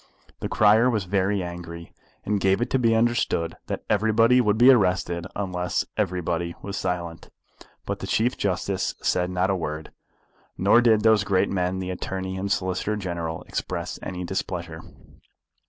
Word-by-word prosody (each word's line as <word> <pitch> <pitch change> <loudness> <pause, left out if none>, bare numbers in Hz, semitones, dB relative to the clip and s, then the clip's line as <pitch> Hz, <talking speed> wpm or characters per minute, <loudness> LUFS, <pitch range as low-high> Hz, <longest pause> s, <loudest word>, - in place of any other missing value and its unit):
The - - -4
crier 110 +3 +5
was 110 -5 0
very 95 +1 0
angry, 85 -1 -8 0.3
and 105 0 0
gave 95 0 +2
it 120 +1 -2
to 130 - +2
be 115 -2 +3
understood 115 -8 +1
that - - -4
everybody 115 +3 +4
would 105 -2 +2
be 125 +3 +8
arrested 90 -6 +1
unless 90 -3 -2
everybody 85 -4 -1
was 100 0 -5
silent; 90 -3 -4 0.6
but - - -3
the - - -6
Chief 120 +3 +1
Justice 95 0 -1
said 90 0 +1
not 90 +1 +1
a - - +1
word, 80 -3 -5 0.7
nor 100 +5 +5
did 110 -3 +4
those 110 -1 +4
great 95 -2 +1
men 90 -1 0
the 95 0 -3
Attorney 95 +1 -4
and 100 +1 -3
Solicitor 95 +2 -1
General 85 -5 -4
express - - -4
any 90 -1 -5
displeasure. 85 -2 -4
95 Hz, 155 wpm, -25 LUFS, 90-105 Hz, 0.7 s, be